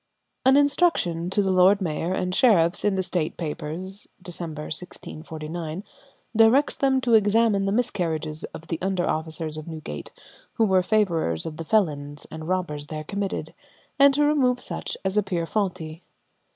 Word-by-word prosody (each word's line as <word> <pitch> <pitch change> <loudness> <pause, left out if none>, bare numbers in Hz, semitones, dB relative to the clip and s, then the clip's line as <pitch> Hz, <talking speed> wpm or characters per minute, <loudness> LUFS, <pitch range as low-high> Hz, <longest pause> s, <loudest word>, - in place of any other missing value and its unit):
An 265 +1 +7
instruction 285 - +2
to 205 +2 +1
the 190 - +1
lord 185 +2 +5
mayor 165 -1 -2
and 180 -1 -1
sheriffs 180 -7 +4
in 205 -2 +2
the 190 - 0
State 175 -3 -2
Papers 170 +5 -5
(Dec., 180 -2 -5
1649) 160 +1 -6 0.5
directs 230 +6 +5
them 270 -2 +2
to 245 -2 +1
examine 210 -1 +4
the - - +1
miscarriages 165 -9 -1
of 160 - -10
the 165 - -2
under 185 -1 0
officers 160 0 -2
of 155 - -8
Newgate 155 - -7 0.4
who 225 - +2
were 190 -2 +4
favourers 175 - +1
of 155 -1 -6
the 165 - -5
felons 145 -8 0
and 160 0 -7
robbers 170 -6 -2
there 155 0 -5
committed, 195 +4 -4 0.5
and 280 0 +8
to 295 - +3
remove 260 -4 +2
such - - -4
as 190 +2 +2
appear 180 -4 -1
faulty. 175 -5 -3
180 Hz, 155 wpm, -25 LUFS, 160-210 Hz, 0.5 s, and